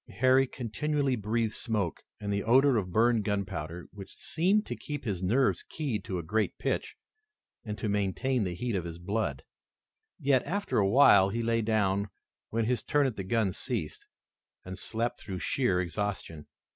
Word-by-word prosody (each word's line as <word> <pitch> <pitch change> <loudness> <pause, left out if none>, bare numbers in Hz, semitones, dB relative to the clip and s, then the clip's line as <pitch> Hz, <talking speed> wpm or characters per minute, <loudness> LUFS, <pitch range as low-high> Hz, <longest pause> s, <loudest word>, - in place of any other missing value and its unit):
Harry 130 +2 +4
continually 135 +3 -1
breathed 110 +1 -1
smoke 105 -7 -2 0.2
and 100 -1 -2
the 100 - 0
odor 130 +4 +5
of 95 -5 -1
burned 115 +2 +3
gunpowder, 95 -5 -3
which 100 -1 -11
seemed 195 +6 +1
to - - -4
keep 145 -2 -6
his 100 -7 -2
nerves 120 +9 +2
keyed 130 -10 -3
to 95 - -3
a 85 - -4
great 105 +6 -1
pitch, - - -2 0.7
and 105 -2 -5
to 110 - -3
maintain 105 +5 0
the 90 -2 -3
heat 120 +4 -2
of 90 - -1
his 85 -1 -6
blood. 85 - -2 0.8
Yet, 135 -2 +3
after 200 - -1
a 100 -1 +3
while, 100 -5 +7
he 115 +4 -2
lay 115 0 +1
down, 100 -2 +1 0.4
when 115 0 0
his 120 -1 0
turn 145 -1 +2
at 130 -5 -1
the 95 - -4
guns 100 -1 0
ceased, - - -4 0.6
and 95 0 -6
slept 115 +5 -3
through 95 -2 -5
sheer 95 -2 +1
exhaustion. 90 -3 -3
110 Hz, 170 wpm, -29 LUFS, 95-125 Hz, 0.8 s, while